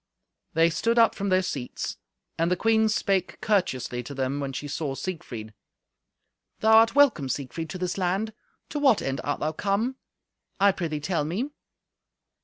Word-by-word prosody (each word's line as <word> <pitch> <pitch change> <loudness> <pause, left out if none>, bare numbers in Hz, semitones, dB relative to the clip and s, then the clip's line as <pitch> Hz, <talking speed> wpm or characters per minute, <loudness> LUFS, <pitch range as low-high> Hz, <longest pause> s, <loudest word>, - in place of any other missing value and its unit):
They 165 +1 +4
stood 230 +9 0
up 230 -1 +6
from 200 0 -3
their 185 0 +3
seats; 135 -8 -4 0.4
and 165 +1 +1
the 180 - +2
queen 220 +2 +3
spake 195 -3 0
courteously 130 - 0
to 140 +4 -8
them 135 +1 -1
when 140 -1 -3
she 145 +2 -5
saw 145 -1 -3
Siegfried. 125 - -6 1.1
"Thou 220 0 +5
art 225 +2 +5
welcome, 255 - +4
Siegfried, 145 +5 -4
to 185 - -5
this 180 +1 -2
land. 190 +5 0 0.4
To 295 - -3
what 270 -7 +4
end 135 0 -2
art 145 - -2
thou 155 - 0
come? 205 - -1 0.6
I 200 +1 +6
prithee 160 -5 -3
tell 160 0 0
me." 200 - -2
180 Hz, 165 wpm, -26 LUFS, 145-215 Hz, 1.1 s, up